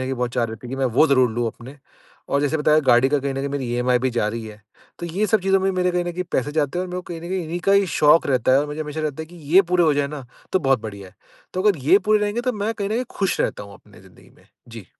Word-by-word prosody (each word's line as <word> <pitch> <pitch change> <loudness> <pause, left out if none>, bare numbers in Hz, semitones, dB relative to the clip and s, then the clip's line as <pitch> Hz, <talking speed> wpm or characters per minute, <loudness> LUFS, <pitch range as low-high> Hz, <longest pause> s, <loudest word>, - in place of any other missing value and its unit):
कहीं 130 +1 -2
बहुत 125 -1 -2
चाह 120 - +1
रहती 115 +1 -7
है - - -9
कि 135 - -4
मैं 135 -1 +1
वो 155 +5 +5
ज़रूर 130 -4 +3
लूँ 120 +1 -1
अपने 130 +6 -12 0.5
और 140 - +2
जैसे 145 +2 0
बताया 155 +1 +3
गाड़ी 120 +2 +5
का 145 +1 +1
कहीं 140 0 -3
न - - -7
कहीं 140 +1 -2
मेरी 140 -3 -3
ईएमआई 125 0 +2
भी 130 +1 0
जा 115 -3 0
रही 115 +1 -5
है। 105 0 -11 0.4
तो 170 - -5
ये 195 +6 -1
सब 215 -1 +2
चीज़ों 195 0 +2
में 195 - +1
मेरे 180 0 +1
कहीं 175 0 0
न 175 - -4
कहीं 180 +1 -4
पैसे 145 +3 -1
जाते 150 +2 -1
हैं - - 0
और - - -10
मेरे 180 - -4
को - - -16
कहीं 165 - -7
न 170 - -8
कहीं 190 -2 -1
इन्हीं 165 +2 -4
का 195 +2 +2
ही 200 -1 +4
शौक 150 +2 +5
रहता 130 -1 +2
है 135 - +5
और 150 - -2
मुझे 150 +1 -6
हमेशा 150 0 -4
रहता 155 0 -3
है - - -10
कि 175 +2 -15 0.2
ये 195 - +8
पूरे 175 -1 +4
हो 155 - +3
जाए 140 0 0
न 140 -4 -7 0.3
तो 190 - +3
बहुत 135 -5 +2
बढ़िया 100 -3 -8
है। - - -22 0.4
तो 185 - -1
अगर 205 -7 +3
ये 190 +5 +6
पूरे 215 0 +4
रहेंगे 210 +3 -1
तो 250 0 -1
मैं 210 +1 -2
कहीं 200 -2 -3
न 215 - -3
कहीं 245 +3 -1
खुश 195 -2 0
रहता - - -1
हूँ 100 -1 -12
अपनी - - -18
ज़िंदगी - - -20
में। - - -24 0.2
जी। 115 -5 -10
150 Hz, 325 wpm, -22 LUFS, 130-180 Hz, 0.5 s, ये